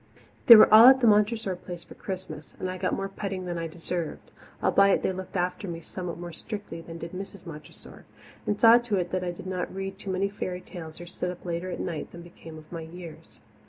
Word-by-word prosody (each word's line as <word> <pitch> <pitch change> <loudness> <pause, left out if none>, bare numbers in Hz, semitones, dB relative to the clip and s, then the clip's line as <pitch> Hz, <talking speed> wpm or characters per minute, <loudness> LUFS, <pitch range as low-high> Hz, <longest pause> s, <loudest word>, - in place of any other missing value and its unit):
They 235 - +13
were 215 - +7
all 225 +3 +11
at 265 0 +8
Montressor 210 -2 +3
Place 175 -1 -9
for - - -13
Christmas, 170 -6 -7
and 185 - -3
I 185 - -7
got 185 - 0
more 195 - -3
petting 195 -1 -5
than 175 -1 -3
I 165 - -3
deserved, 170 0 -5 0.3
albeit 200 0 +4
they - - +1
looked 185 +1 -8
after 180 +3 -2
me 170 -1 -5
somewhat 170 0 -6
more 175 0 -7
strictly 205 -2 -7
than 165 0 -9
did 165 0 -7
Mrs. 195 0 -8
Montressor, 155 -3 -12 0.4
and 205 - 0
saw 230 +1 +8
to 240 -3 -2
it 180 -2 -1
that 185 0 -1
I 180 - -2
did 175 +1 -8
not 185 -1 -3
read 195 0 -6
too 200 - -7
many 190 +1 0
fairy 185 -2 -5
tales 160 -5 -9
or 175 - -8
sit 180 +1 -4
up 180 0 -8
later 175 +1 -3
at - - -5
nights 165 -4 -5
than 170 0 -9
became 160 -2 -12
my 170 -1 -5
years. 165 0 -11
180 Hz, 225 wpm, -27 LUFS, 170-195 Hz, 0.4 s, They